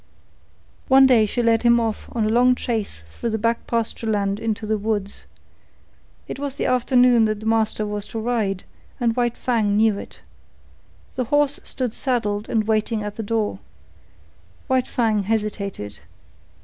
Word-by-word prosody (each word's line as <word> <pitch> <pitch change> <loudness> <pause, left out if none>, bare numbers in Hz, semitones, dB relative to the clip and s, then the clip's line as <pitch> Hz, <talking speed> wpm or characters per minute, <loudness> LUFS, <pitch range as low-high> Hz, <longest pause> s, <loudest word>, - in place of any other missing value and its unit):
One 265 0 +7
day 235 -5 +5
she 240 +4 -1
led 230 -1 +3
him 235 0 +4
off 225 -2 -3
on 225 -2 0
a - - +1
long 250 +3 +4
chase 220 - -3
through 155 - -5
the 220 - -1
back 230 +2 -1
pasture 230 -1 -2
land 200 -2 0
into 225 -1 -2
the 215 0 0
woods. 205 -1 -3 1.0
It - - -6
was 280 -1 -3
the - - -2
afternoon 250 -2 +4
that 215 -1 -1
the - - -8
master 220 -1 +1
was 210 0 -4
to 225 - -5
ride, 220 -5 -1 0.4
and 235 -2 +1
White 240 -1 0
Fang 215 -5 +1
knew 215 -2 +3
it. - - -11 0.9
The 255 - -2
horse 290 +2 +2
stood 250 -4 -2
saddled 215 -6 -1
and 225 -2 +1
waiting 220 0 0
at 210 0 -5
the - - -4
door. 220 0 -1 1.1
White 260 -2 +1
Fang 220 -4 +1
hesitated. 200 - -3
225 Hz, 160 wpm, -22 LUFS, 210-240 Hz, 1.1 s, One